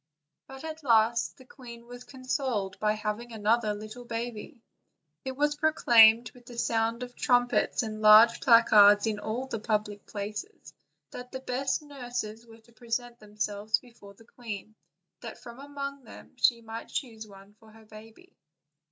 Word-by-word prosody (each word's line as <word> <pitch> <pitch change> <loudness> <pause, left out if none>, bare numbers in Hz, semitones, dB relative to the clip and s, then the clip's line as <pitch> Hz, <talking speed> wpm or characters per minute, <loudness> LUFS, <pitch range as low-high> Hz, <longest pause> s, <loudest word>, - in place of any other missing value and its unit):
But 270 +1 -11
at 320 0 -7
last 230 -2 +2
the 260 - -16
queen 235 -3 -13
was 245 +1 -11
consoled 255 -7 -3
by 210 0 +1
having 215 +2 -5
another 215 0 0
little 215 +4 -9
baby. 235 +2 -6 0.6
It 265 - -4
was 295 +1 +1
proclaimed 235 -7 +5
with 245 -1 -20
the 240 - -11
sound 230 +1 -1
of 245 0 -9
trumpets 245 -1 +1
and 215 -1 -5
with - - -9
large 215 +2 +7
placards 210 -4 +6
in 215 -2 -2
all 220 +5 -4
the 230 -4 -5
public 210 -2 -3
places, 210 - -7 0.4
that 250 0 -9
the 260 - -5
best 265 +3 -2
nurses 245 -5 -6
were 225 0 -16
to 235 - -24
present 240 +1 -5
themselves 210 0 -2
before 220 -5 -16
the 225 - -19
queen, 220 -3 -9 0.5
that - - -9
from 235 +2 -12
among 280 -1 -7
them 225 - -14
she 240 -1 +2
might 225 +1 -8
choose 225 -5 -5
one 195 0 -16
for 220 - -19
her 220 0 -18
baby. 220 - -15
230 Hz, 160 wpm, -28 LUFS, 215-250 Hz, 0.6 s, large